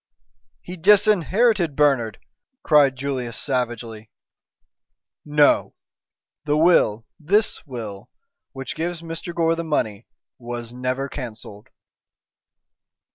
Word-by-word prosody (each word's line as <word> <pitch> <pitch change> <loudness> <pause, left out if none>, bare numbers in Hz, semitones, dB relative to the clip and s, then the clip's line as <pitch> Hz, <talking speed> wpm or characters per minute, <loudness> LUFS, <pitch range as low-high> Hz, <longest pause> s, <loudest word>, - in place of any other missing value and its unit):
"He 180 +1 -8
disinherited 200 - +3
Bernard!" 130 -8 +2 0.5
cried 145 -4 +4
Julius 130 -4 -4
savagely. 120 -4 -4 1.1
"No! 150 -1 +3 0.7
the 150 0 +1
will 135 -10 +3
this 200 +8 +1
will 115 -4 -7 0.4
which 135 -1 -6
gives 170 0 -4
Mr. 165 +1 -6
Gore 165 -1 +1
the 170 - -4
money 115 -9 -2 0.3
was 120 -1 -7
never 130 +2 -2
cancelled." 110 -5 -9
140 Hz, 90 wpm, -22 LUFS, 120-165 Hz, 1.1 s, cried